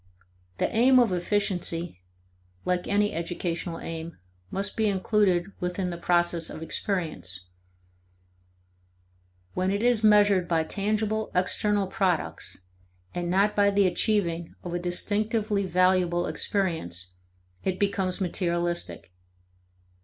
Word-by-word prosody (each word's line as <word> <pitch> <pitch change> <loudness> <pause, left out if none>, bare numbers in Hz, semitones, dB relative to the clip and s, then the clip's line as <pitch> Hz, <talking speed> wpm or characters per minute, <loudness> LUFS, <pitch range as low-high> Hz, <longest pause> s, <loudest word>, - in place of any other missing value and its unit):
The - - +1
aim 255 +3 +6
of 235 -6 +4
efficiency 175 - -1 0.6
(like 180 -1 0
any 205 +1 +2
educational 170 0 -3
aim) 165 0 -6 0.3
must 200 +1 -3
be 220 -1 +1
included 195 -2 +1
within 180 +1 -2
the - - -4
process 175 -1 +3
of 160 - -7
experience. 160 - -2 2.1
When 185 +1 0
it 200 +3 -1
is 240 -2 +3
measured 205 -4 +5
by 165 -2 +2
tangible 215 +4 -1
external 200 +2 +2
products, 185 - -2 0.5
and 175 -1 -3
not 200 +3 +2
by 200 -1 +4
the 200 0 +3
achieving 175 -2 0
of 175 - -5
a 175 - -1
distinctively 205 +3 0
valuable 180 -1 +2
experience, 155 - -2 0.5
it 190 -1 -1
becomes 195 -2 0
materialistic. 175 - -2
185 Hz, 110 wpm, -27 LUFS, 175-205 Hz, 2.1 s, aim